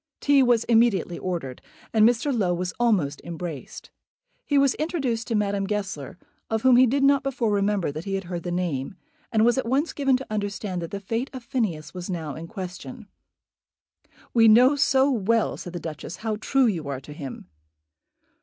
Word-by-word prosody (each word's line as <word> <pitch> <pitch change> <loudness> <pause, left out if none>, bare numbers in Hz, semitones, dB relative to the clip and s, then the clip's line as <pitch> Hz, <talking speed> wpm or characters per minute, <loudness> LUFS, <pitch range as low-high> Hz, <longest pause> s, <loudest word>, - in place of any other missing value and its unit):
Tea 285 -1 +4
was 240 -3 +3
immediately 225 -7 +2
ordered, 165 -9 -4 0.3
and 220 0 +6
Mr. 245 +3 0
Low 185 -6 +1
was 180 +1 -3
almost 185 -12 +1
embraced. 170 -4 -7 0.6
He 285 - +2
was 275 -2 +4
introduced 275 -8 -1
to 230 - -1
Madame 200 -1 0
Goesler, 195 -9 -4 0.3
of 220 -1 -1
whom 260 -1 +6
he 255 +1 +6
did 275 +4 +1
not 280 0 +5
before 250 -5 -1
remember 200 -5 +1
that 155 +3 -7
he 195 -1 -2
had 195 - -3
heard 175 -1 -5
the 175 - -5
name, 175 -4 -2 0.4
and 220 -2 +3
was 240 +2 +3
at 245 - -3
once 275 +7 0
given 270 -3 +2
to 265 - -8
understand 200 -3 -3
that 170 - -5
the 200 - -5
fate 225 +6 -3
of 260 -2 -7
Phineas 215 - -2
was 180 0 -7
now 160 -5 -4
in 160 +3 -8
question. 195 +5 -8 1.3
"We 225 -1 +6
know 250 +6 +6
so 275 0 +3
well," 230 -1 +1
said 175 - -8
the 175 - -4
Duchess, 160 +1 -7
"how 220 0 -3
true 265 +4 +2
you 170 -10 -1
are 140 -2 -3
to 145 +2 -11
him." 140 - -8
210 Hz, 190 wpm, -25 LUFS, 175-245 Hz, 1.3 s, and